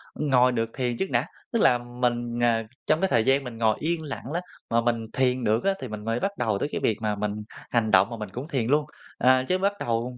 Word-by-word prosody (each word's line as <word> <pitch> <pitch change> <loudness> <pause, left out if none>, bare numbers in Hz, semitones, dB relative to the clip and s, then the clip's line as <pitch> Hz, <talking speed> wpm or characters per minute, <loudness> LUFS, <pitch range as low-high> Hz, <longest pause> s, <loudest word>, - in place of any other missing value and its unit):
ngồi 125 -4 +3
được 115 -2 -1
thiền 125 -3 -1
trước 190 - -2
đã, 120 +2 +1 0.3
tức 230 - +1
là 125 - +5
mình, 120 -1 -2
ờ, 115 -1 +3 0.2
trong 155 +1 +3
cái 190 - +2
thời 115 -2 +3
gian 135 +1 +3
mình 120 -3 -7
ngồi 110 -2 +3
yên 165 +1 -1
lặng 140 -2 -6
ló 170 +3 -1 0.3
mà 115 0 +3
mình 115 -1 0
thiền 130 -1 +1
được 110 +2 +2
á 195 - +3
thì 130 - -4
mình 105 -1 -7
mới 115 +2 0
bắt 200 - 0
đầu 110 -4 0
tới 145 - -1
cái - - -3
việc 110 - +2
mà 105 -1 0
mình 105 +1 -3 0.3
hành 115 -3 +1
động 95 +5 +5
mà 115 - -6
mình 105 -2 -6
cũng 125 +9 -6
thiền 130 -8 -1
luôn. 145 +3 +3 0.3
À, 130 0 +4
chứ 185 - +2
bắt 200 +2 +1
đầu 120 +2 -2
120 Hz, 260 wpm, -26 LUFS, 115-135 Hz, 0.3 s, là